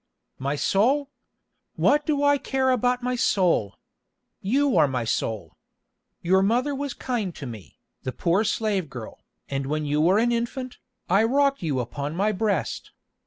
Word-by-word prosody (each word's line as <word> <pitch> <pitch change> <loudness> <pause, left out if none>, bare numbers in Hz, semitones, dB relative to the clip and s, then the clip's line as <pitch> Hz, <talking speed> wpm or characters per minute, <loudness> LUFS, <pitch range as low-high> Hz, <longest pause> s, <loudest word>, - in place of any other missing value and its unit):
"My 140 +2 -1
soul! 260 - +1 0.6
What 295 +1 +2
do 290 -2 +1
I 285 0 +4
care 265 -1 +1
about 250 0 +1
my 250 0 0
soul? 175 - +1 0.7
You 270 +7 +2
are 155 -4 +5
my 125 -3 -2
soul. 110 -1 -2 0.7
Your 190 +2 +4
mother 245 +8 +1
was 280 -1 -4
kind 220 -9 -3
to 140 - -7
me, 110 -6 -10 0.2
the 130 - -3
poor 175 - +1
slave 210 -6 -1
girl, 120 -5 -9 0.2
and 135 -1 -3
when 155 +1 -1
you 150 +1 +1
were 180 +5 +4
an 235 +2 +2
infant, 240 +2 -3 0.3
I 195 +4 +4
rocked 275 +4 +2
you 150 -6 -1
upon 140 +5 -4
my 205 +4 +1
breast. 205 -4 -2
200 Hz, 160 wpm, -25 LUFS, -, 0.7 s, are